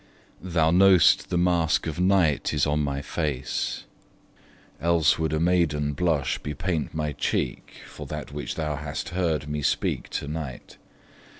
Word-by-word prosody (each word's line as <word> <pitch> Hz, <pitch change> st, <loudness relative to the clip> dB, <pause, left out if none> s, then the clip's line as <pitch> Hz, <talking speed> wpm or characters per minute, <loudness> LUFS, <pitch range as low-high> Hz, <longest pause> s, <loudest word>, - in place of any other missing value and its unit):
Thou 80 Hz, -3 st, +1 dB
know'st 95 Hz, -1 st, +5 dB
the 90 Hz, -, 0 dB
mask 85 Hz, -2 st, +2 dB
of 80 Hz, 0 st, -4 dB
night 90 Hz, -6 st, +2 dB
is 75 Hz, -, +2 dB
on 75 Hz, 0 st, 0 dB
my 70 Hz, -1 st, -2 dB
face; 75 Hz, -5 st, -3 dB, 1.0 s
Else 85 Hz, -2 st, +3 dB
would 80 Hz, -2 st, 0 dB
a 80 Hz, -, 0 dB
maiden 80 Hz, -4 st, +1 dB
blush 75 Hz, -2 st, 0 dB
bepaint 80 Hz, +1 st, -3 dB
my 75 Hz, -1 st, -1 dB
cheek -, -, -2 dB
For -, -, -10 dB
that 75 Hz, -1 st, -6 dB
which 70 Hz, -2 st, -5 dB
thou 75 Hz, -2 st, -2 dB
hast 75 Hz, +3 st, -5 dB
heard 80 Hz, -5 st, -1 dB
me 75 Hz, 0 st, -3 dB
speak -, -, -1 dB
to -, -, -4 dB
night. 75 Hz, -4 st, -6 dB
80 Hz, 145 wpm, -25 LUFS, 75-85 Hz, 1.0 s, know'st